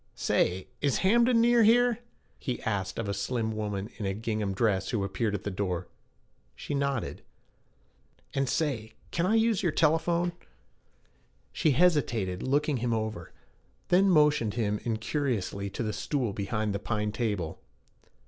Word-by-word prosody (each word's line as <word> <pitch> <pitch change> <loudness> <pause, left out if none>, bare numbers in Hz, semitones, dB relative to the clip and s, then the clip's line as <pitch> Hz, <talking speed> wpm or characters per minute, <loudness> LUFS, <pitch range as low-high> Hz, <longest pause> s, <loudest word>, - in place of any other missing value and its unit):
'Say, 90 +1 0
is 140 -2 +2
Hamden 235 +4 +5
near 240 0 +5
here?' 240 +2 +4 0.4
he 125 -3 -3
asked 95 -4 -2
of 115 - -2
a 100 - -1
slim 110 +3 -1
woman 105 -2 -3
in 105 - -4
a 95 - -1
gingham 110 -2 -2
dress 95 -2 +1
who 110 -4 0
appeared 105 +2 -1
at 100 - -5
the 105 - -3
door. 90 -2 -2 0.7
She - - -5
nodded. 140 -4 -1 1.1
'And 135 -1 0
say, 115 -9 -1 0.2
can 170 +1 0
I 215 - +3
use 225 -3 +3
your 175 -5 +1
telephone?' 170 +3 +2 1.2
She 155 - +2
hesitated, 120 - +2
looking 145 +1 +1
him 120 0 -1
over, 110 -6 -4 0.6
then 190 +2 +5
motioned 150 - +3
him 105 -3 0
incuriously 110 -4 -2
to 115 - -4
the 110 -1 -2
stool 125 -6 -1
behind 105 +1 -2
the 100 - -2
pine 105 0 -2
table. 105 -8 -2
115 Hz, 150 wpm, -29 LUFS, 105-150 Hz, 1.2 s, Hamden